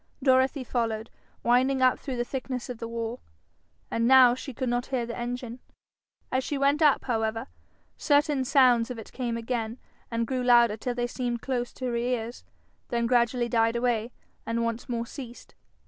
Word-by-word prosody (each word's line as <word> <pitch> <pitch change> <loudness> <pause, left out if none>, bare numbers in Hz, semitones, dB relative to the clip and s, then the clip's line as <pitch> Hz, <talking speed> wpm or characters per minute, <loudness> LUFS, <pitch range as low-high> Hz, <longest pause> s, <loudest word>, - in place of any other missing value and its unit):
Dorothy 260 +1 +3
followed, 230 -2 -2 0.3
winding 260 +2 +3
up 255 - +4
through 265 -3 -5
the 240 - +1
thickness 255 0 -5
of 240 - -8
the 230 - -4
wall. 230 +1 -4 0.7
And 230 0 +1
now 255 -1 +8
she 260 +2 -6
could 260 +1 -3
not 245 +1 -1
hear 255 -3 -1
the 235 - -6
engine. 245 0 -5 0.7
As 260 0 +1
she 285 - -2
went 280 +3 +2
up, 295 -3 +4
however, 225 -1 -1 0.5
certain 290 -2 +2
sounds 250 -3 +4
of 250 - -5
it 225 - -10
came 240 -3 -2
again, 230 -1 -3 0.3
and 230 0 -1
grew 255 +1 -2
louder 240 -3 +5
till 245 +3 -4
they 240 0 0
seemed 240 -1 -3
close 245 -2 -2
to 260 - -6
her 245 -1 -1
ears, 235 0 -2 0.5
then 235 -2 0
gradually 240 0 +2
died 230 -1 +2
away 235 -1 0 0.3
and 230 0 -1
once 230 +1 -3
more 235 -1 -2
ceased. 245 -1 -10
245 Hz, 180 wpm, -27 LUFS, 230-255 Hz, 0.7 s, now